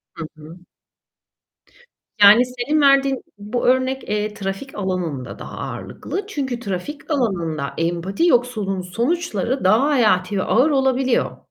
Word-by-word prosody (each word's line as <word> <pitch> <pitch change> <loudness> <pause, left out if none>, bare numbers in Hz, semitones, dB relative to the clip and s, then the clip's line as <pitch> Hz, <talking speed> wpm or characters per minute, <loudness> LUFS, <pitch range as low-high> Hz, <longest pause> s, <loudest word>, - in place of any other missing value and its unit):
Hı 165 - -6
hı. 160 +3 -12 1.6
Yani 210 +5 +8
senin 250 +5 -1
verdiğin 275 -1 +4 0.2
bu 210 +4 -3
örnek, 260 +1 +1
eee, 210 0 -1
trafik 195 +6 -6
alanında 180 -9 -3
daha - - -9
ağırlıklı. 400 - -5
Çünkü 265 - -3
trafik 235 - -6
alanında 170 - -1
empati 175 - 0
yoksulluğunun 220 - +1
sonuçları 245 - -2
daha 215 +8 +4
hayati 210 -8 +2
ve - - 0
ağır 260 +7 +3
olabiliyor. 265 -2 +1
230 Hz, 120 wpm, -21 LUFS, 190-265 Hz, 1.6 s, Yani